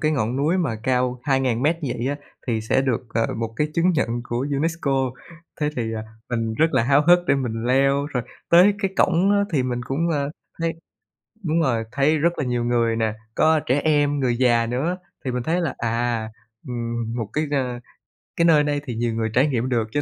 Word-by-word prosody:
cái 155 -1 +1
ngọn 120 -3 -1
núi 155 +7 +1
mà 140 -11 -1
cao 125 -1 0
2.000 130 -4 +1
mét 155 +4 +2
vậy 125 -3 -2
á, 145 - -1 0.3
thì 115 -3 0
sẽ 110 +4 +1
được, 130 -4 0
ờ, 115 -1 +2
một 115 0 -3
cái 150 - +1
chứng 170 +2 +3
nhận 155 - +1 0.2
của 120 +2 -2
UNESCO, 140 -4 0 0.5
thế 150 - +1
thì, 120 - 0
à, 110 - -4 0.3
mình 115 -2 -1
rất 160 +6 +2
là - - +3
háo 140 +4 +4
hức 175 0 +7
để - - +4
mình 115 -4 -2
leo. 135 +2 +3
Rồi 130 -5 -2 0.3
tới 180 +4 +7
cái 195 -2 -1
cổng 185 +2 +3
á 200 0 +3
thì 140 -5 +2
mình 125 -1 -2
cũng, 155 +6 0
ờ, 140 -2 -1 0.3
thấy 165 0 0 0.7
đúng 165 0 +1
rồi, 115 -6 +1
thấy 145 +4 +2
rất 170 +3 +1
là 150 - 0
nhiều 120 -1 -1
người 120 -1 +1
nè, 110 -1 0 0.2
có 160 0 +3
trẻ 130 +3 +2
em, 145 -2 +2
người 125 -2 +1
già 120 -2 +3
nữa 135 +10 -1 0.3
thì 130 - -1
mình 125 -1 -2
thấy 170 +5 0
là, 165 -7 -2
à, 115 -1 -1 0.4
ừm, 115 -1 -3
một 115 -4 -3
cái, 155 +1 0
a, 125 -4 -1 0.6
cái 170 - +2
nơi 155 -3 +5
đây 145 -1 -1
thì 120 -5 -4
nhiều 115 0 -1
người 110 0 -1
trải 130 +5 +4
nghiệm 130 -3 -1
được, 115 -3 0
cho 145 - 0
130 Hz, 220 wpm, -23 LUFS, 120-150 Hz, 0.7 s, hức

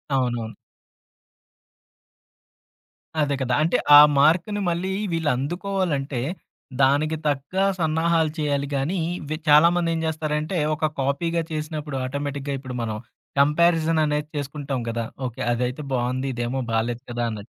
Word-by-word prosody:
అవునవును. 120 -4 -1 2.7
అదే 145 -1 +1
కదా! 130 -1 0
అంటే 165 - +2 0.2
ఆ - - +12 0.2
మార్క్‌ని 170 +8 +3
మళ్ళీ 175 +3 -1 0.2
వీళ్ళు 165 -2 0
అందుకోవాలంటే, 155 -4 -2 0.6
దానికి 145 +4 +3
తగ్గ 145 +3 -2 0.2
సన్నాహాలు 160 0 +1
చేయాలి 145 -2 0
గానీ, 155 +7 -1 0.2
ఇవి 155 +1 -4
చాలామంది 170 +3 +5
ఏం 165 - -1
జేస్తారంటే, 155 +2 -2 0.2
ఒక 155 +1 0
కాపీగా 165 +5 0
చేసినప్పుడు 155 -2 -4
ఆటోమేటిక్‌గా 140 +1 -3
ఇప్పుడు 130 -2 -7
మనం 110 -1 -3 0.4
కంపారిజన్ 160 +2 +3
అనేది 150 0 -1
చేసుకుంటాం 140 -1 -3
గదా! 115 0 -2 0.2
ఓకే. 120 - -8
అదైతే 125 +4 -2
బావుంది. 130 +2 -1
ఇదేమో 120 +2 -2
బాలేదు 115 +2 -1
కదా! 120 0 -1
అన్నట్టు. 105 0 -9
145 Hz, 120 wpm, -23 LUFS, 130-160 Hz, 2.7 s, ఆ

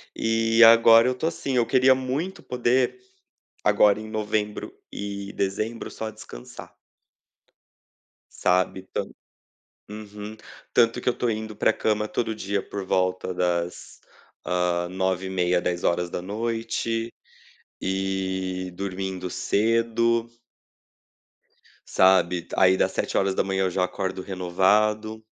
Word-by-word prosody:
E 115 +1 +3
agora 115 +1 +8
eu - - +2
estou 130 +6 -2
assim: 135 -5 -3
eu 120 - +3
queria 130 +1 +5
muito 140 +9 -3
poder, 125 - 0 0.7
agora 105 0 +4
em 110 - -8
novembro 105 -1 -2 0.2
e 100 0 -5
dezembro, 110 +4 -3
só 110 0 -5
descansar. 65 - -11 1.6
Sabe, 95 +1 +1
tan - - -2 0.8
Uhum. 105 0 -8 0.4
Tanto 115 -1 +3
que - - +1
eu - - +1
estou 120 - -1
indo 110 -1 -4
para - - +3
a - - -8
cama 105 -1 0
todo 115 0 -2
dia 100 -1 -2
por 100 -2 -6
volta 95 0 0
das, 90 -1 -2 0.5
ah, 90 -1 0
21h30, 95 -1 0
22h 115 +7 -2 0.7
e 95 -1 -2
dormindo 95 -1 -4
cedo. 115 +3 +1 1.6
Sabe? 95 -2 +3
D - - -13
aí, 95 0 +5
dá - - +3
7h 95 0 0
eu 95 - +1
já 90 +1 0
acordo 95 0 -3
renovado. 105 +4 +1
100 Hz, 110 wpm, -25 LUFS, 95-115 Hz, 1.6 s, agora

